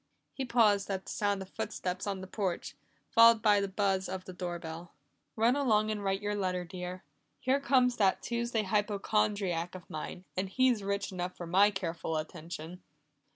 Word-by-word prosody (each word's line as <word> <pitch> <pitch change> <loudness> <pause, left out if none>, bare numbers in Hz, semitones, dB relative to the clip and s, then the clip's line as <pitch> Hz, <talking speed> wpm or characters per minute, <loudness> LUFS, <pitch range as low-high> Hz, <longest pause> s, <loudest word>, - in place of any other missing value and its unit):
He 270 - -3
paused 215 -5 +3
at 190 -1 -3
the - - -6
sound 200 -2 0
of 190 - -15
footsteps 205 -4 -3
on 195 -2 -2
the - - -6
porch, 190 -2 -3 0.4
followed 230 -1 +7
by 205 -2 +5
the 200 - 0
buzz 190 -1 0
of 185 0 -5
the 185 - -8
doorbell. 175 -2 -6 0.4
"Run 230 +3 +3
along 215 -6 +2
and 210 -1 -3
write 195 +1 -1
your 205 0 0
letter, 185 -3 -1
dear 180 +1 -6 0.4
here 265 +2 +2
comes 255 -2 +3
that 195 -3 +2
Tuesday 235 -2 -1
hypochondriac 200 -3 0
of 180 - -10
mine, 175 +4 -6
and 185 +1 -1
he's 255 +1 +3
rich 200 0 -2
enough 180 0 -4
for 175 - -6
my 190 +5 +5
careful 165 -5 -3
attention." 165 +2 -7
195 Hz, 175 wpm, -31 LUFS, 180-215 Hz, 0.4 s, followed